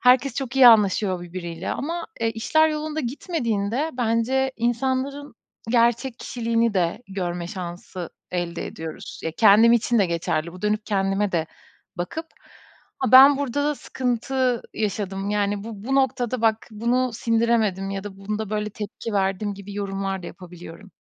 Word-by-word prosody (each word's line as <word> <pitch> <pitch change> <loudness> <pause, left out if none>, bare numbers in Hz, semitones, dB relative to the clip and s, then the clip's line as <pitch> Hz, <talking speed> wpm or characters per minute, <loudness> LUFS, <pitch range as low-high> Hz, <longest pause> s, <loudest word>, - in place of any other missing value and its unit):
herkes 255 +1 +4
çok 265 0 -4
iyi 260 - +8
anlaşıyor 200 -4 +4
birbiriyle. 175 0 -6
Ama, 335 +4 -4
eee, 225 0 +1
işler 315 +8 +3
yolunda 310 0 -3
gitmediğinde 245 - -2
bence 245 +3 +1
insanların 260 +4 -1 0.4
gerçek 235 +1 +2
kişiliğini 230 -2 0
de 175 +5 0
görme 175 -3 -3
şansı 175 -1 -7 0.2
elde 175 -1 -3
ediyoruz. 160 -1 -8
Ya, 165 - -1
kendim 215 +5 +6
için 235 0 +2
de 195 - +4
geçerli, 165 -1 -2
bu 180 +2 -12
dönüp 210 +1 0
kendime 195 0 0
de 165 -2 0 0.5
bakıp, 190 - -4 0.7
"Ha, 260 -1 -1
ben 270 +2 +10
burada 285 0 -1
da 295 0 +1
sıkıntı 255 -1 -1
yaşadım. 200 -1 -2
Yani, 205 0 0
bu 215 -3 -8
bu 270 +3 -1
noktada 255 -2 +1
bak, 220 -1 +2
bunu 240 +4 0
sindiremedim 225 -4 +1
ya 195 0 -4
da 200 -2 -8
bunda 210 +1 -4
böyle 210 0 -2
tepki 210 +2 -6
verdim." 200 +1 0
gibi 200 +1 -9
yorumlar 195 -1 -3
da - - -7
yapabiliyorum. 175 +2 -11
215 Hz, 150 wpm, -23 LUFS, 195-250 Hz, 0.7 s, ben